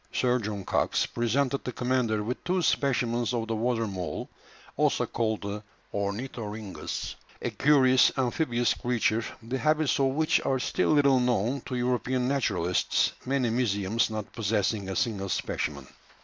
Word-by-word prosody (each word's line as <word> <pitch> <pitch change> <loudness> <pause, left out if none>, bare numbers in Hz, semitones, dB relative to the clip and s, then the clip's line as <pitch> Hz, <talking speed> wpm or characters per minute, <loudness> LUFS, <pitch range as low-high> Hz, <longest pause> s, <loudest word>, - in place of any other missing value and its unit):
Sir 125 0 +2
John 105 -3 -4
Cox - - +1
presented 130 +4 0
the 125 - -3
commander 120 -4 0
with 120 +4 -4
two 180 0 0
specimens 120 -5 +1
of 115 -1 -2
the 115 - -1
water 115 0 0
mole, 95 -4 -5 0.4
also - - +2
called 110 -2 -1
the 100 +1 -4 0.3
ornithorhynchus, 105 0 -4 0.3
a - - -3
curious 130 -3 +5
amphibious 120 -2 +1
creature, 115 -2 0 0.2
the 125 +4 -3
habits 155 -2 +2
of 135 - +4
which 155 +4 +2
are 135 - +1
still 125 - 0
little 140 -3 +5
known 125 +1 +1
to 130 - -3
European 125 +1 0
naturalists, 100 -10 +1 0.2
many 130 -3 +1
museums 110 -2 +1
not 110 -1 -5
possessing 105 -2 0
a 95 - -3
single 105 -7 -1
specimen. 70 -6 -2
120 Hz, 145 wpm, -28 LUFS, 105-130 Hz, 0.4 s, curious